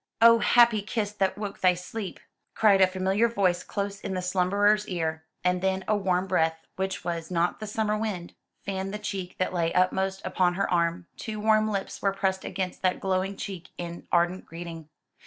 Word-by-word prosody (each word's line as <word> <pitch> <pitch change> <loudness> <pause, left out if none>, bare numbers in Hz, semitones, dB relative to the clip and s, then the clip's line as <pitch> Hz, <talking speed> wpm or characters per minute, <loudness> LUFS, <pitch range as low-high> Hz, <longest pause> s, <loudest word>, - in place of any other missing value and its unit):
"'Oh, 230 0 +8
happy 235 -3 +5
kiss 210 0 -2
that 195 -2 0
woke 205 -1 -5
thy 180 -1 +5
sleep!'" 190 +3 -6 0.4
cried 205 -3 +5
a 190 - +7
familiar 190 +4 +1
voice 190 -6 +1
close 200 +1 -4
in 190 - -3
the 185 - -1
slumberer's 200 +3 +2
ear, 160 -3 -2 0.2
and 180 0 +1
then 190 0 0
a 215 - +3
warm 185 -2 +1
breath, 160 -3 0
which 190 0 -3
was 170 -2 -3
not 175 -1 0
the 215 - -5
summer 215 0 0
wind, 210 -5 -3 0.3
fanned 195 0 -3
the - - -2
cheek 195 -3 -5
that 185 - -1
lay 170 -2 +1
upmost 190 +1 +2
upon 185 -1 +1
her 195 +1 0
arm, 170 +1 +1
two 215 -1 -5
warm 215 0 +3
lips 200 -2 -3
were 195 -1 +2
pressed 190 -1 -1
against 185 -1 -4
that 185 -1 +1
glowing 190 +1 -1
cheek 185 -3 -6
in 170 0 -7
ardent 175 +2 +2
greeting. 165 -2 -8
190 Hz, 190 wpm, -27 LUFS, 180-205 Hz, 0.4 s, Oh